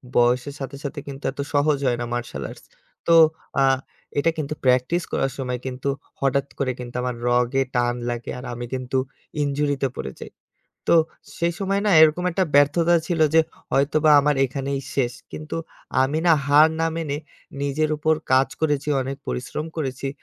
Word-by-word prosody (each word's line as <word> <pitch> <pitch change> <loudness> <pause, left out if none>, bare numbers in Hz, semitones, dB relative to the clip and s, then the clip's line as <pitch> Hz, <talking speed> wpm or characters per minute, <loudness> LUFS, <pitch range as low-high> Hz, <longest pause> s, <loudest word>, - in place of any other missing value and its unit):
বয়সের 125 +3 +2
সাথে, 135 0 -5
সাথে 140 0 -4
কিন্তু 140 0 -8
এত 140 - -18
সহজ 145 0 +3
হয় 120 -1 +1
না - - -1
মার্শাল 120 -1 -4
আর্টস। - - -12 0.4
তো 170 - +6 0.5
আ - - +5 0.5
এটা 165 +3 +3
কিন্তু 155 -1 -2
প্র্যাকটিস 130 +7 +2
করার 135 - 0
সময় 125 -2 -3
কিন্তু 130 +1 -3 0.3
হঠাৎ 140 0 +1
করে 135 -2 +1
কিন্তু 120 -1 -8
আমার 125 -1 -2
রগে 125 +2 +2
টান 120 0 +2
লাগে। 120 -1 -4
আর 125 - -9
আমি 120 0 -5
কিন্তু 130 0 -2 0.5
ইনজুরিতে 145 -1 0
পড়ে 65 - -5
যাই। - - -8 0.6
তো - - +6 0.4
সেই 170 0 +1
সময় 195 0 0
না - - +3
এরকম 160 +3 +5
একটা 185 +2 +1
ব্যর্থতা 155 +4 +4
ছিল 170 -3 -1
যে 160 - +8 0.3
হয়তোবা 150 +3 +3
আমার 150 +1 +2
এখানেই 135 +1 -3
শেষ। 125 -3 +1 0.2
কিন্তু 155 +1 -6 0.5
আমি 140 +4 0
না 170 - +7
হার 150 +2 +7
না 165 - +2
মেনে 155 -4 -2 0.5
নিজের 145 +2 0
উপর 155 +1 +2 0.2
কাজ 130 +1 +5
করেছি, 150 -2 0
অনেক 135 +1 -4
পরিশ্রম 145 +5 -3
করেছি। 135 -3 -3
140 Hz, 170 wpm, -23 LUFS, 130-155 Hz, 0.6 s, যে